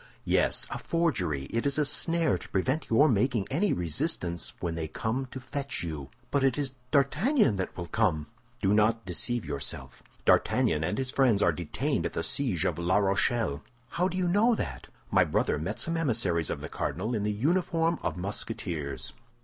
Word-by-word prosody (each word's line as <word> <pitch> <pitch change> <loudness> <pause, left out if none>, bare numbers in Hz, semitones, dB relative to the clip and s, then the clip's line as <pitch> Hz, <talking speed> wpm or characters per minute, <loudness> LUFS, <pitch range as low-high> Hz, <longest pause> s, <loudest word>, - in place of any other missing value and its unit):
"Yes, - - +2
a - - -3
forgery; 95 - 0
it 115 +4 0
is 140 - 0
a 150 - +3
snare 165 +2 +2
to - - -8
prevent 130 +10 0
your 140 +7 +5
making 115 -3 +2
any 185 +9 +2
resistance 85 - -1
when 85 -2 -2
they 80 -1 -3
come 115 - -2
to 130 - -7
fetch 140 -4 -4
you." 75 -5 -5 0.2
"But 140 -1 +2
it 135 -1 +3
is 140 -3 -2 0.2
D'Artagnan 150 - +3
that 95 - -4
will 85 - -3
come." 85 -6 +1 0.4
"Do 95 +1 +4
not 110 +1 +3
deceive 105 +5 -1
yourself. 70 -1 -5 0.2
D'Artagnan 75 - +3
and 85 - -1
his 130 -1 -1
friends 120 -7 +3
are 85 - +5
detained 85 0 -1
at - - -10
the - - -2
siege 120 - 0
of - - 0
La 85 +3 +2
Rochelle." 100 - +1 0.3
"How 180 +7 +1
do 185 0 -4
you 180 -1 +1
know 215 +7 +4
that?" 65 - -5 0.2
"My - - +5
brother - - 0
met 80 +4 -3
some 165 - -1
emissaries 110 - +1
of - - -3
the - - -5
cardinal 105 +8 -3
in 110 - 0
the 105 +1 0
uniform 165 - +1
of - - -2
Musketeers. 85 - -4
115 Hz, 185 wpm, -29 LUFS, 85-145 Hz, 0.4 s, your